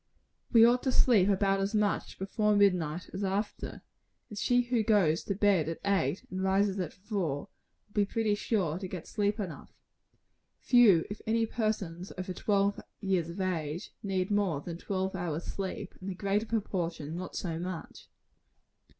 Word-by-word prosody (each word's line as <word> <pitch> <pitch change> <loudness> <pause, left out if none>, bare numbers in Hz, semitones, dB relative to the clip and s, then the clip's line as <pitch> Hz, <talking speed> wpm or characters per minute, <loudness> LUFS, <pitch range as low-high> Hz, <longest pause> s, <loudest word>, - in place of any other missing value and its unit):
We 230 -2 +8
ought 245 +1 +4
to 260 - 0
sleep 210 -7 +4
about 195 0 +2
as 195 +3 -1
much 210 -1 0
before 210 +2 +1
midnight 180 -5 +2
as 190 +2 -3
after; 200 +2 -3 0.5
and 210 - -8
she 245 +4 +2
who 240 -1 +1
goes 200 -7 +3
to 200 - -1
bed 190 -6 +3
at 165 - -3
eight, 200 -2 +1
and 185 0 -3
rises 195 +1 +2
at 175 -4 -2
four, 185 -6 -3 0.4
will 205 - -30
be 205 -1 +3
pretty 220 +1 0
sure 190 -6 0
to 190 - -5
get 180 -3 -6
sleep 205 +1 -1
enough. 180 -8 -6 0.9
Few 225 -10 +5
if 205 - -6
any 225 +1 +2
persons 200 -6 -2
over 185 0 -4
twelve 200 +1 +1 0.2
years 185 -5 0
of 170 +4 -7
age, 170 -3 -2
need 190 -1 -1
more 200 -8 +1
than 170 +3 -6
eight - - -20
hours 185 -4 -1
sleep; 195 0 -5
and 190 - -5
the 190 - -4
greater 200 +3 0
proportion 175 -8 -2
not 180 +1 -6
so 165 -3 -3
much. 180 -1 -7
195 Hz, 165 wpm, -30 LUFS, 180-210 Hz, 0.9 s, We